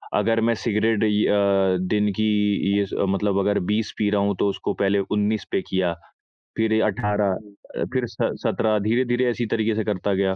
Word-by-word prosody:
अगर 115 Hz, 0 st, +2 dB
मैं 115 Hz, +1 st, +2 dB
सिगरेट 110 Hz, 0 st, 0 dB
इ 105 Hz, 0 st, +2 dB
अ, 100 Hz, -2 st, +2 dB, 0.2 s
दिन 105 Hz, 0 st, +2 dB
की 110 Hz, -, +2 dB, 0.5 s
ये 100 Hz, -, +2 dB
स -, -, -12 dB, 0.2 s
मतलब 100 Hz, 0 st, 0 dB
अगर 100 Hz, +1 st, +1 dB
20 110 Hz, 0 st, -1 dB
पी 105 Hz, -1 st, +1 dB
रहा 100 Hz, -1 st, +2 dB
हूँ 100 Hz, -1 st, 0 dB
तो -, -, +2 dB
उसको 100 Hz, 0 st, -3 dB
पहले 100 Hz, 0 st, +2 dB
19 105 Hz, 0 st, 0 dB
पे -, -, +1 dB
किया, 95 Hz, -2 st, 0 dB, 0.6 s
फिर 110 Hz, 0 st, +2 dB
18 105 Hz, -1 st, 0 dB
अ, 100 Hz, +1 st, -7 dB
फिर -, -, 0 dB
स -, -, -15 dB, 0.3 s
17 110 Hz, -1 st, +1 dB
धीरे-धीरे 120 Hz, +1 st, +1 dB
ऐसे 120 Hz, 0 st, -2 dB
तरीके 110 Hz, -1 st, +1 dB
से 110 Hz, -, -1 dB
करता 100 Hz, -1 st, -1 dB
गया। 95 Hz, 0 st, +1 dB
105 Hz, 190 wpm, -23 LUFS, 100-110 Hz, 0.6 s, अगर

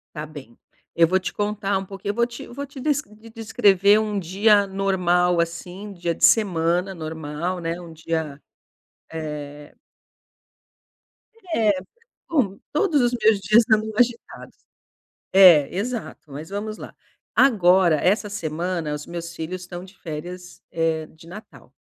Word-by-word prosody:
Tá 150 Hz, -, -4 dB
bem. 145 Hz, -6 st, -12 dB, 0.4 s
Eu 165 Hz, -1 st, +5 dB
vou 185 Hz, +2 st, +2 dB
te 185 Hz, -, -4 dB
contar 205 Hz, -1 st, -1 dB
um 195 Hz, -, -4 dB
pouquinho 195 Hz, +1 st, -5 dB
eu -, -, -10 dB
vou 235 Hz, 0 st, +2 dB
te 240 Hz, -, -9 dB
vou 280 Hz, +4 st, -6 dB
te 280 Hz, 0 st, -12 dB
des 290 Hz, +1 st, +1 dB
des 215 Hz, 0 st, -16 dB
descrever 210 Hz, -3 st, +3 dB
um 210 Hz, -2 st, -2 dB
dia 200 Hz, +3 st, +3 dB
normal 180 Hz, -3 st, +1 dB
assim, 175 Hz, +4 st, -4 dB
dia 175 Hz, -2 st, -2 dB
de -, -, +4 dB
semana 180 Hz, -2 st, +2 dB
normal, 160 Hz, +2 st, -4 dB
né. 165 Hz, +1 st, -3 dB
Um 170 Hz, -2 st, -11 dB
dia, 160 Hz, -2 st, -4 dB, 0.7 s
eh 150 Hz, -2 st, -7 dB, 1.8 s
Eh. 215 Hz, -2 st, +3 dB, 0.6 s
Bom, 210 Hz, -, +1 dB
todos 305 Hz, -3 st, +2 dB
os 240 Hz, 0 st, +2 dB
meus 215 Hz, -2 st, +5 dB
dias 215 Hz, +4 st, +5 dB
andam 220 Hz, 0 st, +3 dB
agitados. 240 Hz, 0 st, -1 dB, 0.8 s
É, 175 Hz, -7 st, +7 dB
exato. 220 Hz, -, -5 dB
Mas 150 Hz, +4 st, -8 dB
vamos 210 Hz, +2 st, -5 dB
lá. -, -, -10 dB, 0.4 s
Agora, 185 Hz, -, +5 dB
essa 205 Hz, +5 st, +1 dB
semana 170 Hz, -3 st, -3 dB
os 150 Hz, 0 st, -6 dB
meus 170 Hz, 0 st, -7 dB
filhos 180 Hz, +3 st, -5 dB
estão 175 Hz, 0 st, -8 dB
de 190 Hz, +1 st, -17 dB
férias, 175 Hz, +3 st, -8 dB
eh, 160 Hz, -1 st, -1 dB
de 160 Hz, +2 st, -18 dB
natal. 210 Hz, +5 st, -13 dB
185 Hz, 145 wpm, -23 LUFS, 165-210 Hz, 1.8 s, É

